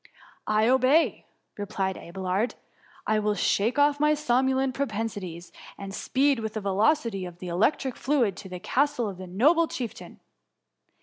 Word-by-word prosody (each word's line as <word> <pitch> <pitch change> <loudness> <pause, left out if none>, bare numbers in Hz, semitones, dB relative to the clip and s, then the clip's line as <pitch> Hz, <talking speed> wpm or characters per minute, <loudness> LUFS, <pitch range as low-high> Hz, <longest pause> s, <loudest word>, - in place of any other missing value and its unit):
^ - - -53 0.3
" - - -41
I 215 +1 +3
obey,'' 260 +5 +3 0.3
replied 190 -1 -2
Abelard. 190 +5 -2 0.3
" - - -27
I 215 - +3
will 210 0 0
shake 205 +6 +1
off 290 0 +3
my 300 +1 +3
somnolent 265 -1 +1
propensities, 205 -9 -4 0.3
and 195 -1 -7
speed 270 +4 +1
with 220 -1 -5
the - - -1
velocity 205 +1 +1
of 175 -1 -8
the 180 0 -7
electric 250 - +1
fluid 250 -8 +1
to 190 - -9
the 180 -1 -6
castle 250 +3 0
of 190 -3 -7
the 185 - -7
noble 300 - +3
chieftain.' 240 -8 -7
220 Hz, 165 wpm, -26 LUFS, 195-270 Hz, 0.3 s, I